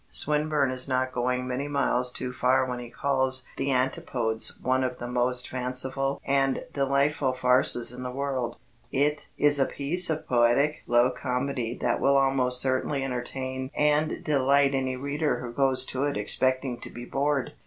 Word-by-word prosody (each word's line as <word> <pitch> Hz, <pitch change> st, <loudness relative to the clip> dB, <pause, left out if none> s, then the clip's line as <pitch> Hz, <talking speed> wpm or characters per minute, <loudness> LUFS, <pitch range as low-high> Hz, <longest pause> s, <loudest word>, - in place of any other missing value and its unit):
Swinburne 150 Hz, -2 st, 0 dB
is 130 Hz, +1 st, -3 dB
not 130 Hz, 0 st, 0 dB
going 125 Hz, +1 st, -1 dB
many 130 Hz, +3 st, -3 dB
miles 125 Hz, -3 st, 0 dB
too 125 Hz, 0 st, -4 dB
far 130 Hz, +1 st, +2 dB
when 125 Hz, -1 st, -4 dB
he 120 Hz, -1 st, -8 dB
calls 130 Hz, 0 st, +1 dB
The 140 Hz, -, -1 dB
Antipodes 125 Hz, -3 st, -1 dB
"one 130 Hz, 0 st, +1 dB
of 125 Hz, -1 st, -3 dB
the 120 Hz, -, -6 dB
most 125 Hz, +1 st, 0 dB
fanciful 130 Hz, +2 st, -1 dB
and 135 Hz, -1 st, +1 dB
delightful 140 Hz, 0 st, +1 dB
farces 125 Hz, -1 st, +3 dB
in 125 Hz, -, -8 dB
the 125 Hz, -, -4 dB
world." 130 Hz, -2 st, -3 dB, 0.4 s
It 145 Hz, +2 st, 0 dB
is 145 Hz, 0 st, +4 dB
a 135 Hz, -, +3 dB
piece 170 Hz, +6 st, +2 dB
of 160 Hz, -1 st, -3 dB
poetic 125 Hz, +5 st, +2 dB
low 120 Hz, +1 st, +3 dB
comedy 125 Hz, -1 st, -3 dB
that -, -, 0 dB
will 140 Hz, 0 st, +4 dB
almost 130 Hz, -2 st, +2 dB
certainly 135 Hz, +1 st, -1 dB
entertain 130 Hz, +1 st, -4 dB
and 150 Hz, +1 st, +1 dB
delight 140 Hz, -1 st, +3 dB
any 130 Hz, -1 st, -1 dB
reader 145 Hz, +4 st, -2 dB
who 120 Hz, -1 st, -7 dB
goes 130 Hz, -1 st, +2 dB
to 130 Hz, +2 st, 0 dB
it 145 Hz, -, -1 dB
expecting 130 Hz, +4 st, 0 dB
to -, -, -8 dB
be 120 Hz, 0 st, -9 dB
bored. 140 Hz, +1 st, -1 dB
130 Hz, 165 wpm, -26 LUFS, 125-140 Hz, 0.4 s, is